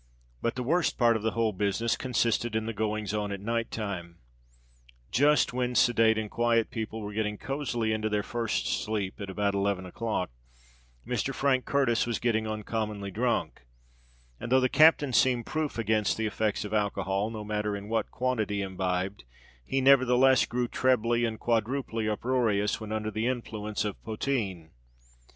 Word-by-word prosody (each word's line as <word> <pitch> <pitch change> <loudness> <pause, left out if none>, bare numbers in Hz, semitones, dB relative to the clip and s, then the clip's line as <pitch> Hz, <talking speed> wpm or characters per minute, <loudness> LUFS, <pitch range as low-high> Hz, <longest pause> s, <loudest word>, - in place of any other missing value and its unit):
But 115 - -1
the 125 - -3
worst 165 +7 +1
part 120 -2 +4
of 110 - -1
the 110 +1 -1
whole 115 -2 +2
business 105 +4 0
consisted 120 -2 0
in 110 0 0
the 115 - -3
goings 105 -1 -2
on 105 -1 -2
at 100 - -4
night 115 +3 -2
time. 90 -6 -5 0.9
Just 145 -1 +3
when 125 0 -1
sedate 115 -1 +4
and 110 -1 -2
quiet 115 -1 +1
people 110 -1 -4
were 105 0 -6
getting 105 0 -1
cozily 125 -5 -2
into 110 0 -1
their 105 -1 0
first 120 -2 -2 0.2
sleep 105 -2 -3
at 100 - -5
about 100 +1 0
eleven 100 -1 0
o'clock, 90 - -3 0.7
Mr. - - -2
Frank 135 -2 +1
Curtis 125 -5 +2
was 120 - -1
getting 110 -2 0
uncommonly 105 -2 -3
drunk; 115 - -1 0.7
and, 120 - -6
though 130 - +6
the 130 0 +2
captain 150 -3 +5
seemed 125 -2 +3
proof 155 -4 -2
against 110 -2 +1
the 110 - -1
effects 105 0 -1
of 105 - -6
alcohol, 100 -1 0
no 110 -2 -6
matter 105 0 -2
in 100 +1 -9
what 110 0 -1
quantity 110 -6 -1
imbibed, 95 0 -2 0.4
he 135 - -1
nevertheless 130 -1 +5
grew 120 0 -1
trebly 120 -2 +2
and 110 -1 -3
quadruply 115 -1 -1
uproarious 110 -3 0
when 110 -1 -6
under 110 0 -2
the 110 +2 -1
influence 110 -4 -3
of 105 - -4
poteen. 105 -8 -3
110 Hz, 165 wpm, -28 LUFS, 105-120 Hz, 0.9 s, though